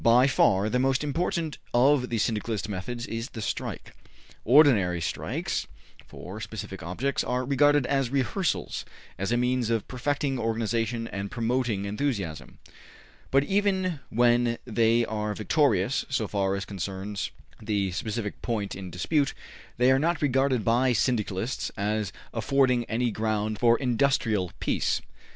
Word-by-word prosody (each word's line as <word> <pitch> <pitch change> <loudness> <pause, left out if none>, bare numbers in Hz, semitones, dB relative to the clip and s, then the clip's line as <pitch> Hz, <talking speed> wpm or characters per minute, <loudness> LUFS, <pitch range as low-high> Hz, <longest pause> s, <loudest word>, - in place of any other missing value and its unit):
By 120 +2 +6
far 100 -7 +3
the 125 +3 +1
most 135 +2 +2
important 160 +1 -2 0.2
of 130 +1 +4
the 115 - -1
Syndicalist 110 0 -1
methods 120 +5 -4
is 115 +4 -4
the 115 - -8
strike. 105 - -4 0.5
Ordinary 115 - +5
strikes, 80 - -2 0.4
for 100 +5 -9
specific 95 -4 -6
objects, 105 +12 -1
are 125 +1 -1
regarded 145 +1 +4
as 135 -2 +1
rehearsals, 140 - -1 0.4
as 95 +3 -1
a 120 - +3
means 125 -1 +1
of 115 -2 0
perfecting 135 +1 -1
organization 115 0 -1
and 100 0 -4
promoting 120 -3 -1
enthusiasm, 100 - -3 0.7
but 135 +1 +4
even 190 -2 +1
when 120 0 +3
they 115 0 +3
are 105 -1 -3
victorious 140 +3 +2
so 125 -5 0
far 100 -1 0
as 100 - -4
concerns 100 +1 -4 0.3
the 100 -3 -1
specific 105 +3 -4
point 110 -4 -2
in 95 -1 -7
dispute, 95 - 0 0.4
they 125 +2 +5
are 135 - +4
not 170 +2 +1
regarded 135 -4 +2
by 125 +2 +3
Syndicalists 110 -1 -1
as 105 -1 -1 0.2
affording 130 -3 +2
any 120 +1 0
ground 110 0 -1
for 120 -1 +5
industrial 120 -7 +1
peace. - - 0
115 Hz, 135 wpm, -27 LUFS, 105-130 Hz, 0.7 s, By